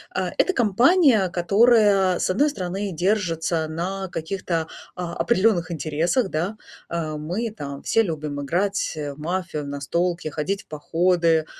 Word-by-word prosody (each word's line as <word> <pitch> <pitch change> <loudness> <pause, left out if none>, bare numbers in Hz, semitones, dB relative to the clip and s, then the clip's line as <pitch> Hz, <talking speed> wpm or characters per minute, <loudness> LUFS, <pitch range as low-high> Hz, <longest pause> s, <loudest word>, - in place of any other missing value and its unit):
э, - - +1 0.2
это 380 - +3
компания, 240 - +4
которая, 200 0 +4
с - - 0
одной 280 +12 +3
стороны, 195 -4 -4
держится 170 -3 0
на 185 +5 -3
каких-то, 165 -1 -3 0.3
а, 175 -1 -4
определенных 190 -6 +2
интересах, 165 - 0
да. 180 +7 -2 0.3
Э, 160 -2 -3
мы 180 +10 -3
там 140 -6 -7
все 225 - +3
любим 150 -5 -4
играть, 190 +8 -1
э, 145 -2 -4
в 140 - -16
мафию, 170 -1 -3
в - - -7
настолки, 170 +4 -2
ходить 185 +7 -3
в - - -45
походы. 165 +1 +1
175 Hz, 145 wpm, -23 LUFS, 160-200 Hz, 0.3 s, компания